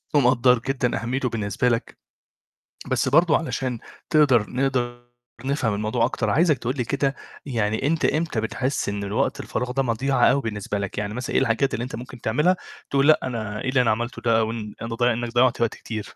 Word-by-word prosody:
ومقدّر 125 -2 +4
جدًا 125 -2 -1
أهميته 125 +2 -1
بالنسبة 110 +1 0
لك، 115 -1 -2 0.9
بس - - +1
برضه 160 +3 +5
علشان 130 -6 -3 0.3
تقدر 135 -9 +4
نقدر 125 -2 -1 0.4
نفهم 135 -6 0
الموضوع 110 +3 0
أكتر، 120 - -1
عايزك 155 -2 +3
تقول 125 +2 -3
لي 125 - 0
كده، 140 +1 0 0.3
يعني 110 -1 -1
أنت 160 +1 +1
إمتى 155 -7 0
بتحس 125 +4 -2
إن 100 0 -3
الوقت 100 +1 -1
الفراغ 125 0 -3
ده 135 +2 0
مضيعة 130 +3 +1
أوي 140 - +1
بالنسبة 105 -3 -3
لك؟ 100 -1 -5
يعني 105 0 -2
مثلًا 125 +3 -4
إيه - - +4
الحاجات 130 +2 +1
اللي 115 - -2
أنت 125 -2 -5
ممكن 125 0 -9
تعملها 150 +12 +2 0.3
تقول 140 0 +2
لأ 155 - +6
أنا 110 -4 -4
إيه - - -2
اللي 130 -1 +3
أنا 115 - +3
عملته 120 +3 -3
ده 115 -1 +3
أو 110 0 0
ان 110 -2 -6
أنت 115 0 -4
ض 115 - -2
إنّك 120 -1 0
ضيّعت 120 -1 +3
وقت 115 - +1
كتير؟ 110 -2 -7
120 Hz, 195 wpm, -24 LUFS, 115-135 Hz, 0.9 s, لأ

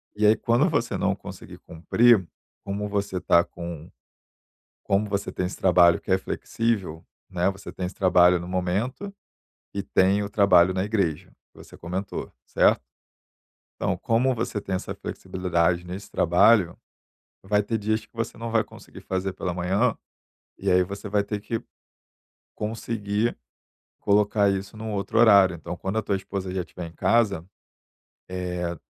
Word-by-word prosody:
E 105 +1 +1
aí 110 - +6
quando 115 +2 +2
você - - -1
não - - +1
conseguir - - -10
cumprir, 100 +6 +3 0.4
como 100 +1 -3
você 100 -2 -2
está 85 -1 +4
com 85 -2 -8 0.9
como 100 +1 +1
você 100 0 -2
tem 90 - -2
esse 90 - -4
trabalho 85 -2 +5
que - - -6
é 95 - +5
flexível, 95 -4 -2 0.3
né, 90 -1 +1
você 95 0 -8
tem 90 - -4
esse 90 - -6
trabalho 90 -1 +4
no 85 - -7
momento, 100 - -2 0.6
e 100 - -2
tem 100 +1 +2
o 100 - -5
trabalho 95 -4 +5
na 95 0 0
igreja, 95 -5 -1 0.2
que - - -25
você - - -15
comentou, 95 +3 -5
certo? - - +3 0.9
Então - - -1
como 125 +3 +1
você 115 -3 -3
tem 95 -1 -3
essa 95 - -5
flexibilidade 90 -1 -1
nesse 95 +3 -8
trabalho, 90 +1 +4 0.7
vai 105 +1 +2
ter 110 +2 -2
dias 110 +1 -1
que - - -27
você 115 0 -4
não 115 0 -5
vai 115 -1 +2
conseguir - - -14
fazer 95 0 -2
pela 90 -1 -4
manhã, 95 +7 +1 0.6
e - - -1
aí 90 0 +5
você 100 +3 -7
vai 100 0 +2
ter 105 0 -4
que 115 +2 -3 0.9
conseguir 110 0 -2 0.7
colocar 105 0 +3
isso 100 +2 -4
num 110 0 -5
outro 100 +2 -1
horário. 100 -6 +6
Então 85 +2 -7
quando 95 +5 -3
a - - 0
tua 100 - -1
esposa 95 -1 -5
já 95 - -1
estiver 90 0 -7
em - - -15
casa, 100 -1 +1 0.8
eh, 90 -1 -3
100 Hz, 160 wpm, -25 LUFS, 90-105 Hz, 0.9 s, aí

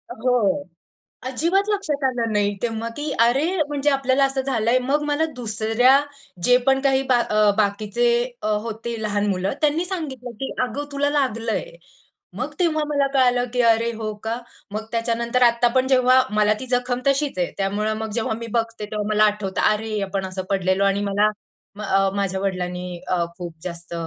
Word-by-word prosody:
हो. 220 -5 +1 0.6
अजिबात 345 +10 +1
लक्षात 310 -9 -1
आलं 235 -3 -1
नाही 205 -1 +1
तेव्हा 230 -1 -2
की 295 0 -3
अरे, 250 +6 +3 0.2
म्हणजे 290 0 0
आपल्याला 275 0 +2
असं 270 0 -1
झालंय, 250 -2 +1
मग 275 +4 0
मला 295 +2 +1
दुसऱ्या, 235 +3 +3 0.4
जे 250 0 +6
पण 265 0 +4
काही 270 -1 +3
बा 245 - +5 0.4
बाकीचे 210 +3 0 0.4
अ, - - -2 0.2
होती 230 0 -5
लहान 205 -1 0
मुलं, 190 +2 -1
त्यांनी 310 +3 +2
सांगितलं 275 - -5
की 270 - -3
"अगं, 285 +3 -3
तुला 285 0 0
लागलंय." 230 -8 -1 0.7
मग - - -4
तेव्हा 310 -3 +2
मला 285 -2 +1
कळालं 245 -2 +3
की 250 - +2
"अरे 230 +1 +1
हो 215 -1 -4
का?" 225 +2 -2 0.3
मग 215 +1 -4
त्याच्यानंतर 235 +1 0
आत्ता 235 0 +4
पण 260 0 +3
जेव्हा 255 0 +5
मला 210 0 +4
ती 260 - -6
जखम 245 0 0
तशीच 275 -5 +1
आहे. 175 - 0
त्यामुळं 205 +2 0
मग 220 0 -4
जेव्हा 220 - -1
मी 230 - -6
बघते, 225 -2 -2
तेव्हा 210 0 -4
मला 215 0 +4
आठवतं 205 -3 -1
अरे, 215 0 -2
आपण 195 0 -3
असं 185 0 -5
पडलेलो 190 0 +1
आणि 195 +1 +1
मला 210 +2 +3 0.5
अ, 195 -1 +2
माझ्या 195 -1 -1
वडिलांनी 180 -2 -3
अ, 175 -2 +1
खूप 175 -2 -6
जास्त 170 -1 -7
230 Hz, 170 wpm, -22 LUFS, 205-265 Hz, 0.7 s, जे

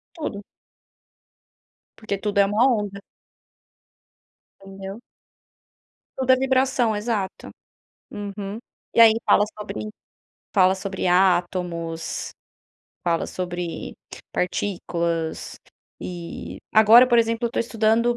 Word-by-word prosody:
Tudo. 215 -11 -5 1.5
Porque 215 -3 -3
tudo 205 0 -2
é 200 - +6
uma 210 +5 +3
onda. 205 -5 -1 1.6
Entendeu? 195 +2 -9 1.2
Tudo 260 -1 -1
é - - +6
vibração, 260 -3 +2
exato. 210 -3 -3 0.6
Uhum. 205 0 -6 0.4
E - - +1
aí 225 -1 +9
fala - - +5
sobre 210 0 -5 0.7
fala 190 -2 +5
sobre 190 0 -4
átomos, 175 -2 0 0.7
fala 170 -2 +1
sobre 175 - -5 0.4
partículas 170 -3 -2 0.4
e 175 -2 -7
agora, 220 +3 +8
por 240 -1 +4
exemplo, 230 +1 +1
eu - - -4
tô - - -2
estudando 230 +1 +2
200 Hz, 95 wpm, -23 LUFS, 180-230 Hz, 1.6 s, aí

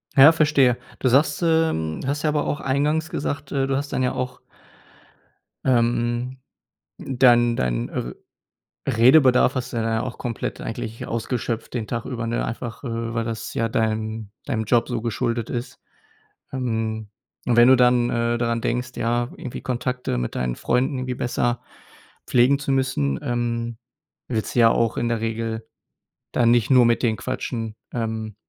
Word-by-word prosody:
Ja, 140 +3 +9
verstehe. 145 -6 +3 0.2
Du 130 - +2
sagst, 145 +4 +3
ähm, 160 - +1
du - - -5
hast 145 +2 -1
ja 155 - +2
aber 150 -1 0
auch 150 - -2
eingangs 150 +4 0
gesagt, 140 -1 -4
äh, 135 -1 0
du 135 - 0
hast 140 0 -4
dann - - 0
ja 125 - +1
auch 125 0 -4 1.2
ähm, 120 0 +1 0.6
dann 120 -2 +4
dein, - - -1
äh 60 - -4 0.8
Redebedarf 130 +2 +5
hast 130 -1 -3
du - - -2
dann 115 - 0
ja 115 0 0
auch 125 - -5
komplett 120 -3 -4
eigentlich 115 0 -5
ausgeschöpft 115 0 -3
den 115 -3 -2
Tag 115 +1 -4
über, 120 -3 -4
ne? 115 +1 -1
Einfach, 115 +1 -6
äh, 115 -2 -3
weil 115 -1 0
das 115 -1 -5
ja 115 0 0
deinen 110 -1 -2
deinem 115 -6 -1
Job 115 +2 +2
so 120 -3 -2
geschuldet 115 0 -2
ist. 120 +2 -5 0.7
Ähm, 110 -4 -2 0.4
und 120 - +2
wenn 120 +1 +8
du 130 - +8
dann, 125 -1 +4
äh, 115 0 0
daran 115 -1 0
denkst, 125 +2 -1
ja, 120 +1 0
irgendwie 125 - -7
Kontakte 125 - -2
mit - - -3
deinen 60 -1 -1
Freunden 130 +2 0
irgendwie 130 0 -3
besser 120 0 -1 0.7
pflegen 130 +3 +4
zu 140 -1 -2
müssen, 100 - 0
ähm, 120 -1 -2 0.5
willst 110 -3 -2
du - - +3
ja 115 -1 +7
auch 115 0 +1
in 120 - 0
der 115 -1 0
Regel 115 0 -3 0.7
dann 120 -1 +4
nicht 120 -3 +3
nur 125 -2 +7
mit 115 0 +2
den 115 -2 +2
quatschen. 115 -3 -4 0.2
Ähm 110 -2 -3
120 Hz, 170 wpm, -23 LUFS, 115-130 Hz, 1.2 s, Ja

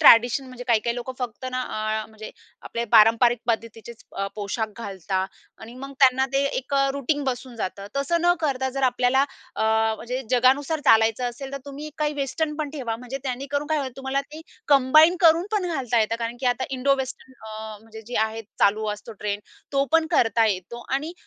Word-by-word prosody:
Tradition 245 -1 +6
म्हणजे 250 -1 -9
काही-काही 235 +1 +2
लोकं 245 +2 -5
फक्त 250 0 -5
ना, 255 0 -2
अ, 215 -1 -2
म्हणजे 220 0 -10 0.3
आपले 235 0 -3
पारंपरिक 230 +2 +6
पद्धतीचेच 230 0 -4
अ, 195 0 -1
पोशाख 215 +2 -2
घालता 190 -3 -3 0.3
आणि 230 +2 -11
मग 275 +2 -8
त्यांना 265 0 +5
ते 275 +1 +2
एक 270 +2 -3
अ, 275 0 +3
रुटीन 280 +1 -1
बसून 255 -1 -4
जातं. 200 -1 -4
तसं 325 +5 +1
न 350 0 +4
करता, 265 -4 0
जर 275 +1 -4
आपल्याला 250 +1 +3 0.3
अ, - - -2 0.3
म्हणजे 250 +3 -4
जगानुसार 270 +5 +3
चालायचं 225 +2 +4
असेल, 270 +3 -8
तर 275 - -3
तुम्ही 290 +2 -7
काही 300 0 0
वेस्टर्न 290 +2 -2
पण 300 -2 -3
ठेवा. 245 -7 -4
म्हणजे 250 +3 -6
त्यांनी 265 +1 -3
करून 285 +1 -1
काय 315 0 +1
होईल, 265 -3 -3
तुम्हाला 270 +1 -1
ती 300 +3 -11 0.3
कंबाईन 310 +5 +6
करून 335 +2 +5
पण 395 -4 +1
घालता 250 -6 0
येतं 220 +1 +1
कारण 230 +1 -3
की 255 - -1
आता 245 +1 +1
इंडो 270 +1 +2
वेस्टर्न 260 0 -6
अ, 215 0 -7
म्हणजे 220 0 -12
जी 245 - -7
आहे 225 +1 -7 0.2
चालू 215 +2 +3
असतो 210 +2 -9
ट्रेंड, 205 0 -3 0.3
तो 275 0 +3
पण 325 0 +4
करता 230 -6 +3
येतो 185 +1 -2 0.2
आणि 305 +5 -2
255 Hz, 190 wpm, -24 LUFS, 225-275 Hz, 0.3 s, Tradition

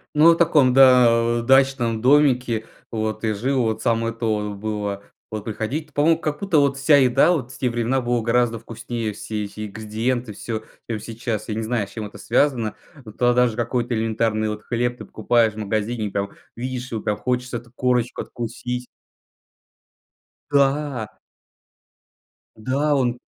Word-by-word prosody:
Ну, 155 +3 +7
от 165 - +2
таком, 150 -6 +4
да, 130 -2 +7 0.3
э, - - -2
дачном 130 -3 +3
домике 125 -4 +3 0.3
вот 110 -1 -3
и 110 - +1
жил. 130 +6 0
Вот 110 -1 -1
самое 115 0 0
то 115 -2 -1
вот 100 - -7
было. 105 -1 -3 0.3
Вот 110 -1 -5
приходить 140 +8 -4
По-моему, 155 +3 +3
как 150 -2 -3
будто 195 -5 +1
вот 140 -1 +2
вся 140 +2 +5
еда 135 +5 +4
вот 130 -7 -1
в - - -11
те 125 - 0
времена 120 +3 0
была 120 -1 0
гораздо 115 0 +1
вкуснее, 115 -1 -5
все 105 +1 -4
эти 105 +1 -7
ингредиенты, 110 +3 -3
всё, 110 +2 -5 0.3
чем 110 -2 -2
сейчас. 110 0 -4
Я 110 - -3
не 115 - -2
знаю, 110 -2 -1
с - - -17
чем 110 0 -5
это 105 - -13
связано. 120 -3 +1 0.3
Вот 110 - -12
тогда 120 -1 +3
даже 120 -3 0
какой-то 120 +1 -1
элементарный 110 -1 0
вот 105 0 -5
хлеб 120 +1 -1
ты - - -9
покупаешь 115 0 +1
в - - -14
магазине 110 +1 -2
и - - -5
прям 100 0 -3 0.3
видишь 125 +1 -5
его, 110 -2 -3
прям 105 - -1
хочется 125 +2 -2
эту 120 0 -13
корочку 125 -1 0
откусить. 125 +1 -5 1.7
Да. 140 -4 +1 1.5
Да, 135 +6 0
он 125 -3 0
120 Hz, 170 wpm, -22 LUFS, 110-130 Hz, 1.7 s, Ну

